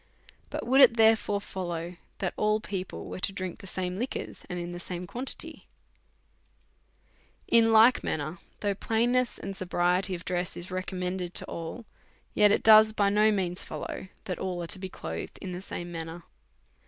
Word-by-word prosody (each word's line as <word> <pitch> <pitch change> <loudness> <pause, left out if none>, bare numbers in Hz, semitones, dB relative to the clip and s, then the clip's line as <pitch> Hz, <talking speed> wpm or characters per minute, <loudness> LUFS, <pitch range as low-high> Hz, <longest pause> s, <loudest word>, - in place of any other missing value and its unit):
But - - -4
would 265 +3 +5
it 235 -3 +7
therefore 220 -2 +4
follow 175 -3 -5 0.2
that 190 -3 -2
all 210 0 +2
people 190 -3 -5
were - - -6
to 190 - 0
drink 185 -2 -5
the 195 - -10
same 185 0 -3
licjuors, 250 +3 -4
and 175 0 -4
the 175 - -6
same 175 0 -5
quantity? 250 +9 -6 1.8
In 225 -1 +5
like 225 +3 +6
manner, 155 +3 -3 0.2
though 205 -1 +1
plainness 240 +5 +1
and 195 0 -6
sobriety 180 +1 +1
of 175 - -9
dress 180 -1 -2
is 175 +2 -8
recommended 185 -1 -3
to - - -2
all, 170 +8 -6 0.5
yet 210 -1 +5
it - - +2
does 215 0 +8
by 200 -2 +3
no 210 +2 +4
means 185 -3 -1
follow - - -6 0.2
that 180 - -3
all 180 -2 -3
are 165 - 0
to 190 - -8
be 190 0 -5
clothed 80 - -6
in 190 - -6
the 180 +1 -5
same 175 -2 -6
manner. 165 0 -6
185 Hz, 170 wpm, -28 LUFS, 175-215 Hz, 1.8 s, does